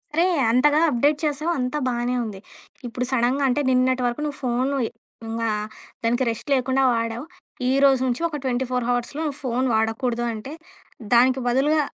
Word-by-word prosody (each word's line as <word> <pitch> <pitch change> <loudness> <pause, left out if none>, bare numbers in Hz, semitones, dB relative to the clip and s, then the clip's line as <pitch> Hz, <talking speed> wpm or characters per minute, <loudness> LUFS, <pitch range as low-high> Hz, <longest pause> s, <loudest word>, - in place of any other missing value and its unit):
అరే! 335 +2 +4 0.3
అంతగా 290 +5 +4
అప్‌డేట్ 290 +3 +2
చేసావు 305 +3 -1
అంతా 250 +3 -1
బానే 245 0 -1
ఉంది. 210 -4 -6 0.5
ఇప్పుడు 245 +1 -3
సడెన్‌గా 260 +2 +1
అంటే 255 +4 +1
నిన్నటి 255 0 +2
వరకు 240 +4 -3
నువ్వు 290 -2 -4
ఫోను 255 +3 0
ఇ - - -7 0.4
ఇంగా 225 0 -2 0.5
దానికి 240 +3 +1
రెస్ట్ 230 +6 -5
లేకుండా 265 0 +1
వాడావు. 230 +2 -2 0.4
ఈరోజు 270 -1 +4
నుంచి 250 +3 -1
ఒక 300 - -4
24 250 -1 -1
హావర్స్‌లో 245 +5 -1
నువ్వు 290 -2 -3
ఫోను 255 +1 0
వాడకూడదు 230 +2 0
అంటే 225 +6 -7 0.6
దానికి 255 +2 +5
బదులుగా 285 +5 +3
255 Hz, 155 wpm, -23 LUFS, 240-275 Hz, 0.6 s, దానికి